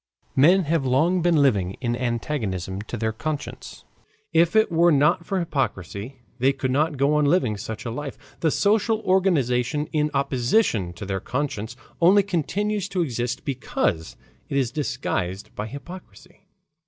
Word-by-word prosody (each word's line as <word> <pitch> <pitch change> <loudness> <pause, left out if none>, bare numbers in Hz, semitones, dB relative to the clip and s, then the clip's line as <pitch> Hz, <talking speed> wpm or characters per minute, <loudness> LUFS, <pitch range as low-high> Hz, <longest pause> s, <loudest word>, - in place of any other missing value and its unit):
Men 175 +8 +5
have 160 -1 0
long 155 +8 +2
been 170 -1 +3
living 100 -9 +1
in 120 -2 -1
antagonism 115 - -2
to 115 +3 -6
their 110 0 -1
conscience. 150 +6 -6 0.5
If 170 +4 +3
it 220 -4 +4
were 170 +1 +4
not 150 +4 +3
for 195 - -1
hypocrisy 130 - -3 0.2
they 135 +3 +3
could 130 -1 -2
not 150 +2 +1
go 140 +2 +2
on 150 -1 +3
living 140 -8 +2
such 110 +3 -6
a 115 - -3
life. 140 +3 -5 0.2
This 160 -3 +1
social 215 +1 +2
organization 150 - +1
in 150 -1 +1
opposition 130 - +1
to 90 - -8
their 95 0 -2
conscience 125 -1 -3 0.3
only 195 +4 +6
continues 200 +3 -1
to 180 -2 0
exist 120 -3 -3
because 110 - -2 0.3
it 140 - -1
is 130 -4 +1
disguised 115 - -3
by 105 - -4
hypocrisy. 140 - -12
140 Hz, 155 wpm, -24 LUFS, 115-170 Hz, 0.5 s, only